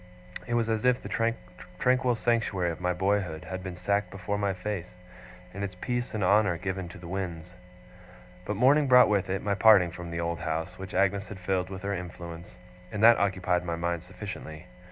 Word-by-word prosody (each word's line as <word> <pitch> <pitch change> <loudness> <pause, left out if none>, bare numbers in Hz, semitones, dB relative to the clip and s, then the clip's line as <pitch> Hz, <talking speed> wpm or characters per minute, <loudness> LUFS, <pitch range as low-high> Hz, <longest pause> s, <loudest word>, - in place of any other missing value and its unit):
It 120 - 0
was 115 -1 +1
as 110 -1 0
if 125 0 +3
the 115 0 0 0.5
tranquil 125 +2 +2
sanctuary 115 -7 0
of 80 - -8
my 90 0 +1
boyhood 95 -3 0
had 95 0 -5
been 90 -1 -6
sacked 100 +1 0
before 100 +1 -4
my 100 -1 +1
face, 90 -1 -5 0.6
and 100 +1 -5
its 95 -2 -4
peace 120 0 -2
and 105 - -1
honour 100 -2 +3
given 95 -1 -4
to 95 - -11
the 85 -2 -10
winds. 90 -2 -5 0.9
But 105 +3 -3
morning 140 +6 +4
brought 125 -2 +7
with 100 -3 +1
it 95 +1 -2
my 100 - +1
parting 95 -3 +6
from 85 0 -8
the 85 0 -4
old 85 0 -2
house, 80 +3 -3
which 95 -1 -7
Agnes 100 0 +2
had 105 - -8
filled 90 0 -1
with 95 -1 -7
her 100 0 -1
influence; 85 -2 -8 0.3
and 105 +1 -2
that 115 0 +8
occupied 90 -3 +1
my 85 -1 -2
mind 85 0 -2
sufficiently. 90 -3 -8
95 Hz, 195 wpm, -28 LUFS, 90-105 Hz, 0.9 s, that